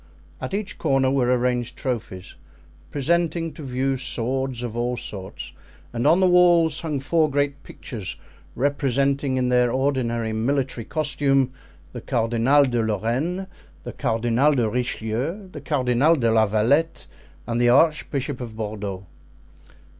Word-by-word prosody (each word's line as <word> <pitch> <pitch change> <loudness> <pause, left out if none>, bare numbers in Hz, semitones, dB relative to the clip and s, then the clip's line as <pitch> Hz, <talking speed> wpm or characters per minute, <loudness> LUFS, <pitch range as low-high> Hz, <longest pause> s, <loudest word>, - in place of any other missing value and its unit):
At - - -3
each 205 -1 -5
corner 135 -1 +2
were 130 -2 +2
arranged 125 -1 0
trophies, 95 -8 -4 0.6
presenting 165 +2 0
to - - -10
view 135 0 -1
swords 130 0 -2
of 115 -2 -5
all 120 +1 -1
sorts, 95 -4 -7 0.4
and 120 0 0
on 170 - +5
the 190 - +4
walls 175 -3 +4
hung 155 -4 -2
four 155 +3 +1
great 140 0 -1
pictures 105 -10 -7 0.4
representing 140 0 0
in 125 -1 +1
their 125 -1 +3
ordinary 120 -4 0
military 125 +1 -1
costume 140 -4 +1 0.4
the 120 - -6
Cardinal 120 +4 +2
de 120 -3 0
Lorraine, 120 - -1 0.4
the - - -7
Cardinal 120 +6 +1
de 120 -4 +2
Richelieu, 125 - -3
the 150 - -8
Cardinal 140 +2 +2
de 115 -6 +1
la 110 -1 +4
Valette, 125 +11 +1 0.4
and 120 0 -1
the 120 - +4
Archbishop 140 -1 +2
of 115 -3 -7
Bordeaux. 105 -3 -5
130 Hz, 135 wpm, -23 LUFS, 115-145 Hz, 0.6 s, on